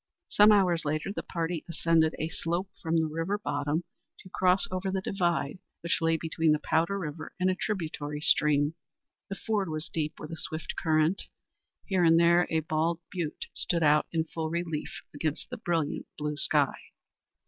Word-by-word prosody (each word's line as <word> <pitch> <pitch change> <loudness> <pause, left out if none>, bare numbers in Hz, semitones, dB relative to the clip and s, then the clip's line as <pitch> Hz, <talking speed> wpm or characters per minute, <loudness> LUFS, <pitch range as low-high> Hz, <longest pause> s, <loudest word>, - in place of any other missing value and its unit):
Some 210 +1 +7
hours 180 -5 +4
later, 155 +6 -2
the - - -3
party 165 -1 -3
ascended 165 -1 +2
a 155 - -1
slope 175 +4 -2
from 165 -1 -1
the 160 - +3
river 165 +6 -2
bottom 145 -3 -1 0.4
to 185 - -14
cross 185 +4 +3
over 185 +1 -2
the 190 0 0
divide 175 -5 -1 0.2
which 170 0 0
lay 165 0 +3
between 160 -1 +1
the - - +2
Powder 165 +6 +1
River 160 -4 -6
and 185 +1 +3
a - - -1
tributary 155 -7 -3
stream. 150 0 +3 0.6
The 195 - -3
ford 205 -3 -1
was 155 +1 -4
deep, 155 -1 -2
with - - -8
a 165 - -5
swift 155 +1 -4
current. 160 +3 +1 0.6
Here 190 -3 +1
and 165 0 +6
there 170 +1 +5
a 160 -1 +1
bald 160 +2 0
butte 170 -5 -3
stood 170 -2 0
out 150 0 +4
in 160 -1 +1
full 160 0 -4
relief 165 -2 -3
against 150 - -3
the 250 - -4
brilliant 170 -9 -1
blue 150 0 -2
sky. - - +2
165 Hz, 175 wpm, -29 LUFS, 155-180 Hz, 0.6 s, Some